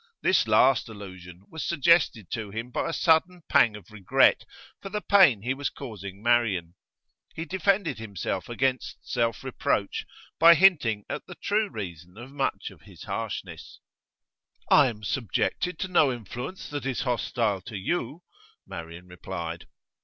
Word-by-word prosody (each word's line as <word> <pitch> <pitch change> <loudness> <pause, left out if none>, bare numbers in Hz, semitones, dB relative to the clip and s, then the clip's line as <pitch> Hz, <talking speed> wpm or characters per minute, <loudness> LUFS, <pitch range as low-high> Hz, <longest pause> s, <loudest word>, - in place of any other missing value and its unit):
This 145 - +3
last 115 +3 +4
allusion 95 -4 -11
was 160 - -5
suggested 160 - +2
to 110 -3 -4
him 115 +4 -6
by - - -2
a - - -1
sudden 170 +2 +2
pang 110 -3 +4
of 105 +1 -13
regret 105 -4 +3 0.4
for 195 - -7
the 210 +2 -2
pain 185 - +5
he 125 +3 0
was 140 +1 -3
causing 100 -6 -9
Marian; 110 -8 +1 0.6
he 165 - -4
defended 190 - 0
himself 100 -5 -4
against 130 -1 -1
self 115 -3 -1
reproach - - -2 0.3
by 170 +1 +9
hinting 145 - +3
at - - -6
the 180 - -9
true 210 +3 0
reason 90 -4 -8
of 120 +4 -10
much 140 -1 -2
of - - -17
his - - -14
harshness. - - -6 0.9
'I 140 - +7
am 110 -4 -6
subjected 135 - -1
to 190 - -3
no 160 -6 +3
influence 125 - -7
that 145 -2 -4
is 135 0 -2
hostile 115 -5 -1
to 105 +2 -7
you,' 165 - -3 0.4
Marian 85 +1 -9
replied. 90 -2 -7
120 Hz, 150 wpm, -26 LUFS, 100-160 Hz, 0.9 s, by